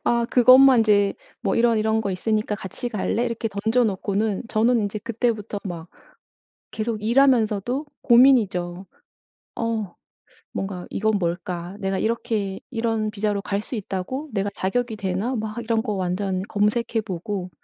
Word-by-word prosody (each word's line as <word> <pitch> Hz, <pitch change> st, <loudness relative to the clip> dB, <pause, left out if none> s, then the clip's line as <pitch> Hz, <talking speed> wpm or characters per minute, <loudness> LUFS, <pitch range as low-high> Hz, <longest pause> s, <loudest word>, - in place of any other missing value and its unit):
아 235 Hz, 0 st, +2 dB
그것만 255 Hz, +1 st, +7 dB
이제 205 Hz, -2 st, +3 dB, 0.3 s
뭐 195 Hz, -, 0 dB
"이런, 230 Hz, -1 st, +3 dB
이런 220 Hz, +1 st, +1 dB
거 205 Hz, -3 st, -2 dB
있으니까 215 Hz, +3 st, -1 dB
같이 205 Hz, +4 st, -5 dB
갈래?" 230 Hz, +2 st, -1 dB
이렇게 230 Hz, -1 st, -2 dB
던져놓고는 210 Hz, -1 st, 0 dB
저는 225 Hz, 0 st, +2 dB
이제 205 Hz, +1 st, -4 dB
그때부터 225 Hz, -2 st, -2 dB
막 170 Hz, -3 st, -6 dB, 0.8 s
계속 220 Hz, -1 st, -3 dB
일하면서도 240 Hz, +1 st, +2 dB, 0.2 s
고민이죠. 205 Hz, -8 st, +4 dB, 0.7 s
어 225 Hz, -5 st, -2 dB, 0.6 s
뭔가 190 Hz, -2 st, -4 dB
'이건 215 Hz, 0 st, +1 dB
뭘까? 175 Hz, +1 st, -3 dB
내가 195 Hz, -1 st, -1 dB
이렇게 220 Hz, -3 st, -1 dB
이런 225 Hz, -3 st, -1 dB
비자로 210 Hz, -1 st, -1 dB
갈 200 Hz, 0 st, -2 dB
수 250 Hz, -, -5 dB
있다고? 210 Hz, +8 st, -4 dB
내가 200 Hz, -1 st, -1 dB
자격이 225 Hz, +4 st, -1 dB
되나?' 200 Hz, +6 st, -2 dB
막 215 Hz, 0 st, -4 dB
이런 225 Hz, -1 st, 0 dB
거 220 Hz, -3 st, -3 dB
완전 185 Hz, 0 st, -1 dB
검색해 220 Hz, +2 st, +1 dB
보고 185 Hz, -1 st, -4 dB
215 Hz, 300 characters per minute, -23 LUFS, 195-230 Hz, 0.8 s, 그것만